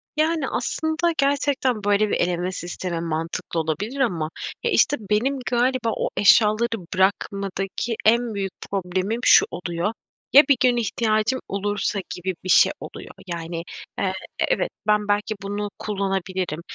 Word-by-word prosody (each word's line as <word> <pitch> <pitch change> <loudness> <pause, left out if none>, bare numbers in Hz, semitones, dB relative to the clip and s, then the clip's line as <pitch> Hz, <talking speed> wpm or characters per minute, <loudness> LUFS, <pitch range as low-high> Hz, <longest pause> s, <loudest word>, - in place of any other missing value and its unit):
Yani, 310 -2 +1
aslında 315 +7 0
gerçekten, 275 -5 +1
böyle, 205 +1 +2
bir - - +1
eleme 175 +1 0
sistemi 175 -1 -4
mantıklı 165 0 -3
olabilir 190 - -3
ama, 175 -12 0 0.3
e, 470 - +1
işte, 290 - +3
benim 255 +6 +1
galiba 245 0 +1
o - - -1
eşyaları 215 +2 +4
bırakmadaki 195 +3 -1
en 235 +1 +3
büyük 195 -2 -3 0.2
problemim 190 +3 -1
şu - - +7
oluyor: 175 +4 -2 0.4
"Ya, 285 +3 +10
bir 280 - +7
gün 250 -1 +4
ihtiyacım 220 +1 +1
olursa?" 205 +1 -1 0.2
gibi 185 +1 -3
bir 185 - -6
şey - - +6
oluyor. - - -9 0.2
Yani, 170 -1 -4 0.4
eee, 190 -1 0 0.3
e - - +3
evet, - - +1 0.2
ben 210 -1 +2
belki 205 +1 0
bunu 205 +1 -3
kullanabilirim. 190 -5 -2
205 Hz, 140 wpm, -23 LUFS, 185-240 Hz, 0.4 s, Ya